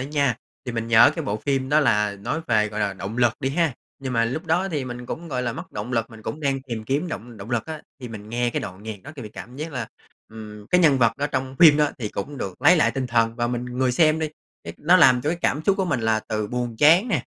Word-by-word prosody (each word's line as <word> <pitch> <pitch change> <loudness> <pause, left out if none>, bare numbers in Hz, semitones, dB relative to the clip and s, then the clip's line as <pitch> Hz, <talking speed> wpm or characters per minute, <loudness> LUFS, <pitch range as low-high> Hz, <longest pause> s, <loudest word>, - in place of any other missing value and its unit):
nha. 140 -2 0 0.3
Thì 125 - -3
mình 115 0 -3
nhớ 115 0 +7
cái - - -3
bộ 105 - -1
phim 130 +3 -1
đó 150 +2 +4
là 105 -7 +2
nói 100 +11 -3
về, 110 -2 +2
gọi 105 0 -5
là, 100 -1 0
động 95 +3 -6
lực 120 -2 +4
đi 135 - 0
ha. 165 -1 +1 0.3
Nhưng 130 -2 -5
mà 115 -1 +2
lúc 155 +9 -4
đó 175 +4 +1
thì 150 -7 -2
mình 125 0 -7
cũng, 170 +5 -6
gọi 125 -4 -2
là, 120 -1 -1
mất - - -9
động 105 +5 -5
lực, 115 -1 -1
mình 110 -1 -13
cũng 150 - -5
đang 135 -2 0
tìm 115 -5 -6
kiếm 145 +8 -1
động 120 - -7
động 105 +4 -9
lực 120 -2 -1
á, 160 -1 -7 0.2
thì 125 - -7
mình 105 -2 -9
nghe 120 +1 0
cái - - -2
đoạn 95 0 -8
nhạc 110 -2 -7
đó 145 - -9
thì 135 - -7
mình 105 - -9
cảm 125 +2 -9
giác 155 +2 -5
là, 120 -4 -4 0.4
ừm, 105 -1 -10
cái 180 - +3
nhân 150 -6 +5
vật 115 -2 +4
ở 145 - 0
trong 130 -2 -3
phim 155 -4 +8
đó 150 -1 +3
thì 110 - -3
cũng 135 +8 -6
được 95 -5 -6
lấy 180 - +7
lại 155 - +3
tinh 135 -1 -3
thần. 115 -1 +1
Và 120 0 0
mình, 120 0 -3
người 125 +1 -1
xem 155 +3 +3
đi, 160 -1 -1 0.4
cái - - -6
nó 175 +4 +5
làm 130 -7 +6
cho 150 - 0
cái 170 - -2
cảm 150 - +1
xúc 195 - +4
của 190 - 0
mình 140 -8 -1
là 110 -1 +1
từ 110 -1 -1
buồn 120 0 -3
chán 170 +10 +6
nè, 165 - 0
125 Hz, 290 wpm, -23 LUFS, 110-145 Hz, 0.4 s, phim